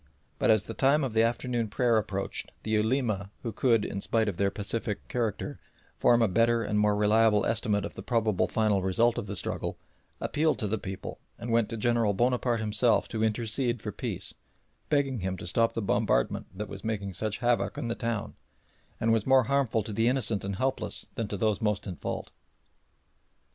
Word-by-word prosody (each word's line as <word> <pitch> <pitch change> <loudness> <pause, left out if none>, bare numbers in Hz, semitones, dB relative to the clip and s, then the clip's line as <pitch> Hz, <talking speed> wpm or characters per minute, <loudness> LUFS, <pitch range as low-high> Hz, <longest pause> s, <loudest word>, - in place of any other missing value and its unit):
But - - +2
as 110 -2 +5
the - - -5
time 140 +3 +3
of 130 -5 -2
the 110 - +4
afternoon 120 0 0
prayer 120 +2 +2
approached 100 -2 -3
the 110 - -3
Ulema 110 -2 +1
who 115 - -2
could, 115 -2 +2
in 100 - -4
spite 110 +1 +1
of 100 -5 -2
their 100 -1 +2
pacific 105 +1 -3
character, 115 -4 -2 0.4
form 120 -1 +4
a - - +4
better 115 +4 +2
and 105 -1 0
more 105 0 +3
reliable 105 0 +4
estimate 105 -3 0
of - - -6
the - - -8
probable 110 -5 +1
final 110 -3 +1
result 115 +6 +2
of 110 - -6
the 100 - -4
struggle, - - -3 0.4
appealed 155 +1 +1
to 110 - -2
the 110 +2 -1
people, 95 -1 -6 0.2
and 120 - -5
went 115 -2 +2
to 115 - -4
General 115 -2 +2
Bonaparte 120 +1 +1
himself 110 +2 +2
to 110 -1 -2
intercede 120 +2 0
for - - -5
peace, - - -3 0.6
begging 140 -4 +1
him 95 0 -3
to - - -8
stop 115 +6 +2
the 115 - -2
bombardment - - +1
that 105 +3 -6
was 95 -1 -9
making 100 -3 -3
such 105 +4 -2
havoc 120 -1 0
in 120 - -3
the 115 - -1
town, 115 -3 -3 0.7
and 115 0 +2
was 110 0 0
more 130 -1 +6
harmful 130 -4 +1
to 105 - -5
the 115 +3 +2
innocent 120 -5 +1
and 100 0 -3
helpless 130 +6 -2
than 115 - -3
to 100 - -4
those 110 +1 +1
most 105 -2 0
in 95 -4 -5
fault. - - -5
110 Hz, 195 wpm, -28 LUFS, 105-120 Hz, 0.7 s, more